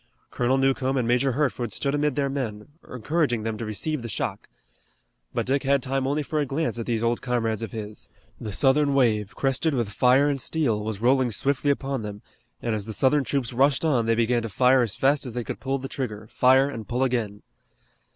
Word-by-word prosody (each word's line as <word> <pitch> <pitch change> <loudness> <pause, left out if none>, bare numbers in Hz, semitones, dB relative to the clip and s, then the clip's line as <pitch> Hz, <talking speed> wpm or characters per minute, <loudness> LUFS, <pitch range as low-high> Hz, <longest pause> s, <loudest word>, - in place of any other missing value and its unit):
Colonel 125 +2 +1
Newcomb 135 0 +1
and 120 -3 0
Major 125 +2 +2
Hertford 130 -4 -1
stood 140 +7 -1
amid 145 -2 0
their 140 -1 +1
men, 125 -6 -4 0.2
encouraging 125 -1 0
them 110 0 -2
to 115 - -3
receive 145 +7 -2
the 115 - -6
shock. 100 - -4 0.8
But - - -2
Dick 135 +1 +1
had 140 -1 +1
time 135 0 -1
for - - 0
only 145 +1 -1
a 150 -2 0
glance 140 -2 -2
at 115 - -5
these 115 -2 -1
old 115 0 0
comrades 115 -3 -1
of 115 -4 -5
his. 105 -1 -7 0.3
The 105 - -5
Southern 140 +5 +3
wave, 110 -6 +1
crested 135 +3 0
with 115 -5 -1
fire 130 +5 +4
and 140 -2 0
steel, 120 -9 0
was 110 -1 -4
rolling 130 +1 +3
swiftly 140 +6 0
upon 135 -2 -1
them, 105 -1 -7 0.4
and 115 - 0
as 105 -1 -3
the 110 - -4
Southern 135 +7 +3
troops 130 -2 -2
rushed 135 +5 +2
on 125 -8 +2
they 115 - +3
began 120 +1 +1
to 115 - -5
fire 130 +4 +4
as 115 -5 -1
fast 140 +2 +2
as 125 -4 -6
they 120 - -2
could - - -6
pull 135 +1 -1
the 135 0 -6
trigger, 110 -6 -5
fire 130 +2 +4
and 115 -7 -7
pull 125 +2 0
again. 115 -6 -2
125 Hz, 215 wpm, -25 LUFS, 115-140 Hz, 0.8 s, fire